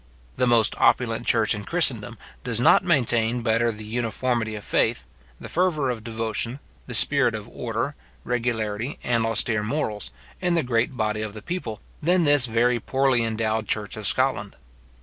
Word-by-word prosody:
The 125 - +1
most 115 -2 +4
opulent - - +2
church - - +3
in - - -5
Christendom - - 0 0.3
does 115 -2 -1
not 125 - +5
maintain 120 -7 +1
better 115 +1 +2
the 105 0 -9
uniformity 115 0 -1
of 105 - -7
faith, 60 - 0 0.3
the - - -8
fervour 160 -7 +1
of 115 -3 -6
devotion, 115 +2 -3 0.3
the 125 - -3
spirit 140 -2 +4
of 105 0 -7
order, 120 +5 -3 0.3
regularity, 115 -1 -2
and 115 -2 +1
austere 115 -1 +2
morals, 105 - -2 0.3
in 180 -2 +1
the 165 - +2
great 125 +1 0
body 110 0 -1
of 110 -1 -5
the 110 - -9
people, 170 - -5 0.2
than 175 +3 +3
this 145 -4 +4
very 120 +2 +2
poorly 130 0 +1
endowed 110 -1 -1
church 105 -2 -1
of 110 -2 -2
Scotland. - - 0
115 Hz, 165 wpm, -24 LUFS, 110-130 Hz, 0.3 s, not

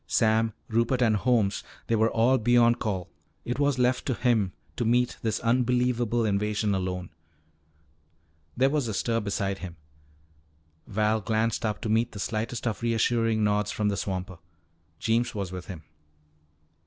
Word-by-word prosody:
Sam, 110 -1 +2
Rupert, 115 +3 +1
Holmes 110 -2 +2 0.2
they 115 - +1
were 110 +1 +3
all 120 +4 +3
beyond 120 +1 +4
call. 95 -5 -2 0.4
It 125 +3 -3
was 145 -2 +2
left 125 0 +1
to 130 - 0
him 110 -7 +1 0.2
to - - -1
meet 120 +2 +1
this 110 -2 -1
unbelievable 120 -1 +1
invasion 105 0 0
alone. 90 -2 -3 1.5
There 135 +2 +3
was 145 -5 0
a 110 - -3
stir 115 +2 0
beside 100 -2 -2
him. 90 -2 -7 1.1
Val 110 +1 +1
glanced 110 +2 0
up 105 -1 -3
to 115 - -3
meet 115 +2 +1
the 105 - -7
slightest 115 +4 -3
of 115 -1 -2
reassuring 115 -1 +1
nods 105 0 +1
from 105 0 0
the 100 - -1
swamper. 95 -2 -4 0.6
Jeems 115 +4 0
was 100 -3 -3
with 90 -1 -7
him. 90 -5 -8
110 Hz, 150 wpm, -27 LUFS, 105-120 Hz, 1.5 s, beyond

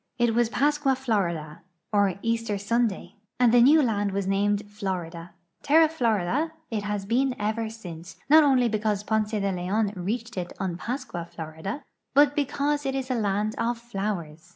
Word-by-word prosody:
It 240 -2 +2
was 235 0 +2
Pascua 290 +1 +2
Florida, 170 -11 -2 0.3
or 200 -3 +3
Easter 230 -2 -1
Sunday, 215 0 -1 0.2
and 245 -2 +5
the 245 - +7
new 295 +5 +6
land 205 -4 0
was 200 0 -1
named 200 +1 +1
Florida. 180 -5 -5 0.3
Terra 315 +2 +5
Florida 255 - 0 0.2
it 215 -2 -1
has 205 -1 -3
been 250 +4 +1
ever 220 +2 -1
since, 175 -6 -9
not 310 +2 +7
only 260 -4 +4
be 215 -2 -1
cause 210 -1 -1
Ponce 215 0 0
de 200 -3 -1
Leon 195 +4 -1
reached 225 +5 -4
it 175 -1 -4
on 185 -3 -2
Pascua 185 -4 -4
Florida, 160 - -6 0.3
but 290 0 +5
because 290 +1 0
it 270 -1 -2
is 265 -1 -3
a - - +2
land 210 -2 0
of 235 +1 0
flowers. 195 -8 -5
215 Hz, 170 wpm, -26 LUFS, 195-245 Hz, 0.3 s, the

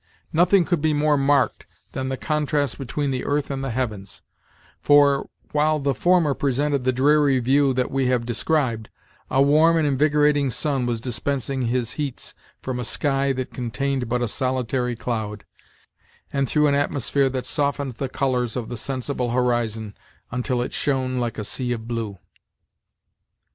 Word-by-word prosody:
Nothing 175 +2 +4
could 175 -3 0
be 155 0 +2
more 150 0 +3
marked 140 -1 +1 0.2
than 130 0 -3
the 130 - -2
contrast 150 -2 -1
between 140 +2 -2
the 130 -1 -2
earth 145 0 -1
and 135 0 -3
the 135 - -2
heavens; 110 -6 -4 0.6
for, 145 -1 +4 0.2
while 155 +1 +2
the 140 -1 0
former 175 -4 +3
presented 140 0 0
the 130 - +4
dreary 140 +1 +3
view 135 +3 +3
that 125 0 0
we 135 -1 +1
have 125 -2 +1
described, 120 -2 -1 0.4
a 135 +1 +4
warm 155 +4 +5
and 160 - +2
invigorating 145 0 +3
sun 130 0 -1
was 120 -2 -1
dispensing 130 +1 -1
his 120 0 -1
heats 140 -4 -4 0.3
from 130 -1 -3
a - - -2
sky 135 +2 0
that 130 -1 -5
contained 130 +1 -2
but 125 0 0
a - - 0
solitary 125 0 -1
cloud, 110 -3 -4 0.9
and 140 -2 0
through 150 -1 +3
an 145 - +3
atmosphere 140 -1 +1
that 130 -1 -3
softened 145 -3 -1
the 135 - -3
colors 125 -3 -1
of 120 -3 -4
the 120 - -5
sensible 130 0 -2
horizon 115 -4 -1 0.4
until 125 0 -1
it - - -6
shone 130 -3 0
like 120 -1 -2
a 105 - -3
sea 125 +3 -3
of 115 -1 -6
blue. 115 -4 -3
135 Hz, 165 wpm, -23 LUFS, 125-145 Hz, 0.9 s, warm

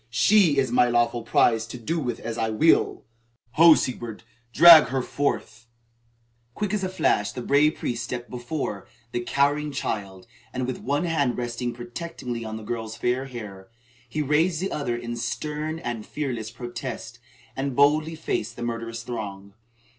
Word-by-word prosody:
She 155 - +4
is 130 -3 +2
my 125 0 +4
lawful 120 0 +1
prize 115 0 +2
to 120 - -7
do 160 +9 -2
with 125 -5 -3
as 115 0 -4
I 115 -1 -1
will. 135 +10 +3 0.5
Ho, 160 +3 +8
Sigebert, 120 -4 -4 0.3
drag 165 +4 +10
her 130 +1 -2
forth!" 120 -5 -3 0.9
Quick 210 -1 -2
as 205 -2 -1
a 185 - -1
flash 105 - +1
the 125 - -6
brave 150 +4 +3
priest 120 -1 -3
stepped 120 0 -5
before, 120 -4 -5 0.2
the 120 - -1
cowering 145 +4 +1
child, 100 -8 -4 0.3
and, 130 0 -1
with 130 0 -4
one 145 +5 -1
hand 145 -7 +1
still 125 - -3
resting 120 +1 -3
protectingly 120 -1 -6
on 110 0 -5
the 110 - -9
girl's 110 0 -4
fair 125 +2 0
hair, 105 -7 -9 0.4
he 150 +4 -1
raised 155 +4 +2
the 190 +2 -2
other 120 -5 -2
in 120 0 -5
stern 150 +6 -3
and 120 -8 -5
fearless 120 -7 -4
protest, 120 0 -7 0.4
and 135 -1 -2
boldly 155 +3 +3
faced 115 -8 -3
the 120 - -6
murderous 115 -1 -4
throng. 100 -5 -6
120 Hz, 165 wpm, -25 LUFS, 115-150 Hz, 0.9 s, drag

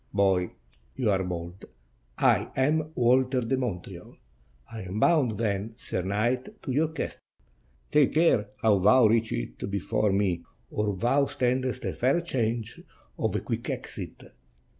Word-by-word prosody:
"Boy, 95 -3 +3 0.5
you 115 -5 +1
are 95 -1 +1
bold; 85 0 -6 0.5
I - - +3
am 155 +3 +1
Walter 125 +1 +3
de 125 +3 0
Montreal." 120 -9 -5 0.6
"I 110 - -5
am 95 +3 -4
bound, 135 - +3
then, 105 0 -2
sir - - -3
knight, 115 +7 -1
to - - -3
your 150 +5 +2
castle." 160 +1 -5 0.7
"Take 150 -2 +4
care 155 -11 +3
how 105 -3 +4
thou 110 +6 +6
reach 115 +1 +3
it - - -4
before 100 +1 0
me, 95 -4 0 0.3
or 105 -2 -1
thou 135 +7 +2
standest 130 0 -1
a - - -1
fair 130 +7 +2
chance 115 -8 -2 0.4
of - - 0
a - - 0
quick - - -4
exit. - - -6
115 Hz, 145 wpm, -27 LUFS, 100-130 Hz, 0.7 s, thou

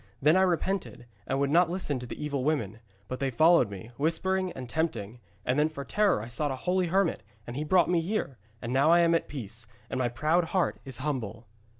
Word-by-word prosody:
Then 150 +4 +4
I 190 - +5
repented, 185 -7 -1 0.2
and 135 - 0
would 140 0 +1
not 170 +2 +4
listen 170 -7 -1
to 125 - -7
the - - -8
evil 140 -3 -2
women. 115 -8 -1 0.3
But 130 - -5
they 135 0 0
followed 155 -1 +4
me, 100 +4 -9
whispering 185 +5 0
and 130 -1 -7
tempting, 125 -7 -2 0.3
and 125 +3 +1
then 150 +1 +3
for 140 -3 -7
terror 200 - +2
I - - -7
sought 145 +5 0
a 135 - -2
holy 180 0 +2
hermit, 190 0 +1 0.2
and 120 - -7
he 145 - -2
brought 175 +2 +3
me 175 -1 +2
here, 165 - -3 0.2
and 120 +1 -3
now 145 +6 +5
am 170 -1 +4
I - - +6
at - - -8
peace, 115 -4 -6 0.2
and 130 - -2
my 125 -1 +1
proud 155 +8 +1
heart 180 +2 0
is 130 -3 -6
humble.' 115 -6 -3
150 Hz, 225 wpm, -28 LUFS, 125-170 Hz, 0.3 s, I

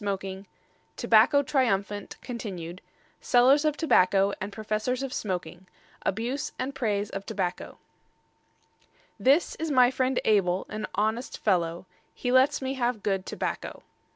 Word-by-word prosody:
III 195 -1 -4 0.5
TOBACCO 260 +6 +5
TRIUMPHANT 205 -7 -1
(continued) 185 -8 -6 0.4
SELLERS 265 +4 +4
OF 300 -1 +1
TOBACCO 195 - +3
AND 195 +2 -4
PROFESSORS 215 +5 -2
OF 265 -1 -4
SMOKING 185 -2 -4 0.3
ABUSE 245 +8 -2
AND 265 +2 -3
PRAISE 210 -6 -1
OF 195 - -5
TOBACCO 190 -4 -4 1.4
This 280 +6 +3
is 320 0 -2
my 255 -3 +5
friend 260 0 0
Abel, 190 -4 +2
an 215 0 -4
honest 220 +4 -1
fellow; 175 -3 0 0.3
He 245 - -2
lets 260 +1 +4
me 265 0 -1
have 245 -4 -1
good 195 -2 -1
tobacco. - - -4
215 Hz, 125 wpm, -27 LUFS, 195-260 Hz, 1.4 s, TOBACCO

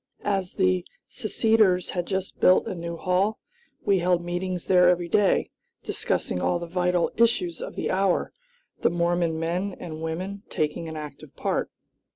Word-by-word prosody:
As 195 -3 0
the 185 -2 +2 0.2
seceders 215 -5 +2
had 175 -1 -2
just 190 -1 -3
built 185 - +5
a - - -3
new 170 -1 -5
hall, 185 +5 +1 0.5
we 195 -2 +4
held 175 0 +1
meetings 180 0 -3
there 180 -1 +5
every 175 -1 +1
day, 195 +3 +2 0.3
discussing 90 - -2
all 175 - +1
the 170 - -5
vital 180 0 +1
issues 225 -7 +2
of - - -6
the - - -2
hour; 190 -1 +1 0.5
the - - +3
Mormon 170 -1 0
men 180 +4 -2
and 160 -2 -7
women 185 +5 -4
taking 155 +2 -2
an 160 - -6
active 150 -1 -9
part. - - -1
180 Hz, 160 wpm, -26 LUFS, 170-190 Hz, 0.5 s, built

